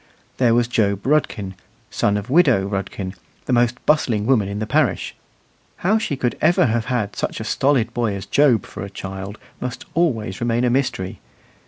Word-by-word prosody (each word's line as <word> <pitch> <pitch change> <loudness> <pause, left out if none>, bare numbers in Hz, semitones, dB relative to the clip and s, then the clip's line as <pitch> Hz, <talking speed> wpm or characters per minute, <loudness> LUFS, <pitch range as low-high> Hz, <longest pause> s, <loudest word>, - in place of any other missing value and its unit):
There 120 -3 +4
was 120 -1 +2
Job 100 -4 0
Rudkin, 120 -9 0 0.4
son 105 0 +1
of 105 +1 -5
widow 130 - +4
Rudkin, 95 -1 -4 0.3
the 130 - -1
most 120 0 +1
bustling 120 -9 +2
woman 115 -6 +3
in 100 +1 -4
the 110 - -2
parish. 130 - +1 0.7
How 215 +4 +4
she 150 - -2
could 125 -2 -1
ever 170 0 +4
have 115 -1 0
had 115 -4 -2
such - - -3
a - - -4
stolid 130 -5 +1
boy 115 -4 0
as 95 0 -6
Job 125 -2 +3
for - - -9
a 100 - -5
child 95 +1 -7 0.2
must 125 0 -5
always 115 - 0
remain 120 0 +1
a 125 - +2
mystery. 125 -8 -1
120 Hz, 180 wpm, -21 LUFS, 100-130 Hz, 0.7 s, There